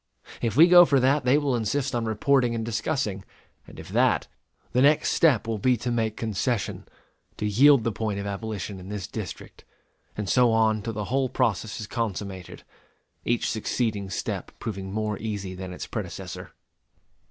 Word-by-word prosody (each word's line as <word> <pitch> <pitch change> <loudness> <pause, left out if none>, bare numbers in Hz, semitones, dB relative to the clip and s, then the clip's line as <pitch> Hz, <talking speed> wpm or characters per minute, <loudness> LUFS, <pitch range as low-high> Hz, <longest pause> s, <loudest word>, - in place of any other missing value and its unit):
If 115 -2 -1
we 165 +3 +9
go 175 0 +9
for 140 -5 +3
that, 135 +2 +2
they 130 +3 +5
will 145 -4 0
insist 125 +4 -1
on 120 -1 -1
reporting 120 +2 +2
and 115 -1 -3
discussing; 110 -3 -2 0.4
and - - -12
if - - -10
that, - - +2 0.5
the 125 - +2
next 145 +2 +4
step 145 -11 +3
will 115 -2 -2
be 125 +3 +2
to 120 +2 -3
make 110 -2 -1
concession 115 0 -2 0.5
to - - -3
yield 130 +5 +5
the 115 - 0
point 105 -1 -3
of 100 - -5
abolition 100 -1 -5
in 90 +1 -10
this 105 -3 -4
District; 105 -4 -8 0.5
and 105 -1 -3
so 120 +5 +4
on 110 -1 +2
till 115 +2 -4
the 105 -1 -4
whole 135 -1 +1
process 110 0 -1
is 105 - -4
consummated, 100 -5 -5 0.6
each 120 0 0
succeeding 110 -2 -2
step 95 - -4
proving 95 -3 -5
more 105 0 -2
easy 100 -4 -4
than 95 0 -7
its 90 - -6
predecessor. - - -6
110 Hz, 175 wpm, -26 LUFS, 105-125 Hz, 0.6 s, we